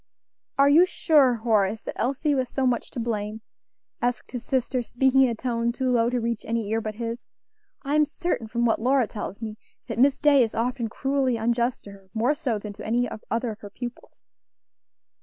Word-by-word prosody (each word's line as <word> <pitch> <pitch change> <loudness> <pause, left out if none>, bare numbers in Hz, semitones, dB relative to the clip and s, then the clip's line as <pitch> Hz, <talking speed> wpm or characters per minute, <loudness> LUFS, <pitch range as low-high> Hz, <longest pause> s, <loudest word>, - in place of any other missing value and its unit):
"Are 275 0 +6
you 325 +6 +6
sure, 290 -8 +4
Horace, 220 -2 +1
that - - -5
Elsie 280 +4 0
was 260 -3 0
so 270 - -1
much 245 -2 0
to - - -6
blame?" 220 -2 -3 0.6
asked 245 0 -2
his 245 -2 -5
sister, 255 0 0
speaking 265 +3 +2
in 260 - +5
a 230 - -2
tone 235 0 -1
too 255 +1 -1
low 235 -1 +3
to 250 0 0
reach 230 -1 -2
any 225 -2 -2
ear 225 0 +1
but 215 -1 -5
his. 230 +1 -4 0.6
"I 280 0 -2
am 300 0 +5
certain, 295 -6 -3
from 235 +2 0
what 225 -1 +2
Lora 260 +1 +3
tells 210 0 -7
me, 215 -1 -5 0.3
that - - -5
Miss 275 +2 +4
Day 290 -2 +5
is 225 -3 0
often 240 +1 -1
cruelly 270 0 0
unjust 235 +2 0
to 200 - -10
her; 195 -1 -16
more 240 +6 +2
so 275 -8 -2
than 205 0 -7
to - - -10
any 240 +3 +1 0.2
other 230 +1 -1
of 215 - -9
her 205 - -9
pupils." 245 +3 -9
240 Hz, 205 wpm, -25 LUFS, 225-265 Hz, 0.6 s, Are